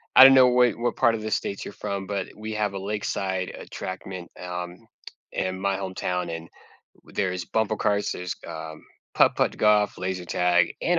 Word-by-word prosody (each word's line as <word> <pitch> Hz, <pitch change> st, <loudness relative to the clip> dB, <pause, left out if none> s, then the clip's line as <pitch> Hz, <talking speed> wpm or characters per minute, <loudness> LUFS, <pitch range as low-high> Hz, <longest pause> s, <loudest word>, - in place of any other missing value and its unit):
I 130 Hz, -, +12 dB
don't 135 Hz, 0 st, +10 dB
know 130 Hz, -1 st, +7 dB
wh 125 Hz, -1 st, +4 dB
what 120 Hz, 0 st, 0 dB
part 115 Hz, -3 st, +3 dB
of 110 Hz, -, -5 dB
the 110 Hz, 0 st, -4 dB
States 100 Hz, -, -2 dB
you're -, -, -7 dB
from, 100 Hz, -2 st, -4 dB
but 100 Hz, -2 st, -2 dB
we 110 Hz, 0 st, -5 dB
have 105 Hz, -2 st, -1 dB
a 95 Hz, -, -4 dB
lakeside 95 Hz, -2 st, -2 dB
attraction, 95 Hz, -1 st, -7 dB
um, 90 Hz, 0 st, -5 dB, 0.6 s
in 95 Hz, 0 st, -2 dB
my 100 Hz, 0 st, 0 dB
hometown, 95 Hz, -2 st, -2 dB
and 80 Hz, 0 st, -9 dB, 0.5 s
w -, -, -20 dB
there's 90 Hz, -2 st, -1 dB
bumper 110 Hz, +2 st, 0 dB
cars, 100 Hz, 0 st, +1 dB
there's, 90 Hz, -1 st, -4 dB
um, 80 Hz, -1 st, -7 dB, 0.3 s
putt-putt -, -, +3 dB
golf, 105 Hz, -1 st, +3 dB
laser 90 Hz, -1 st, -3 dB
tag, 90 Hz, 0 st, +2 dB
and 175 Hz, 0 st, +2 dB
95 Hz, 180 wpm, -25 LUFS, 90-105 Hz, 0.6 s, I